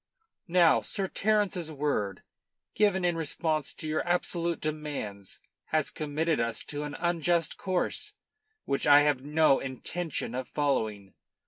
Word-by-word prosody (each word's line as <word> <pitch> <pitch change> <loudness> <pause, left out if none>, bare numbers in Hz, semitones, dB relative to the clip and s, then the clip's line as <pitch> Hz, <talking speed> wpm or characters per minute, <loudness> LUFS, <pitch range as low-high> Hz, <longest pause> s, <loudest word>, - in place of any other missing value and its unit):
"Now, 170 -2 +5
Sir 195 -2 -2
Terence's 200 -5 0
word, 135 -10 -2 0.5
given 195 -3 +2
in 175 -1 +2
response 155 -2 -1
to 155 - -5
your 155 0 0
absolute 170 -1 0
demands, 145 -11 -5 0.3
has 155 -2 0
committed 155 +1 -1
us 115 0 -1
to 145 0 -4
an 150 0 -5
unjust 170 -1 +1
course, 185 -2 -1 0.5
which 140 - -1
I 145 0 +8
have 145 -3 +2
no 150 -1 +4
intention 135 +2 -3
of 130 0 -3
following. 110 -9 -1
155 Hz, 130 wpm, -29 LUFS, 140-170 Hz, 0.5 s, I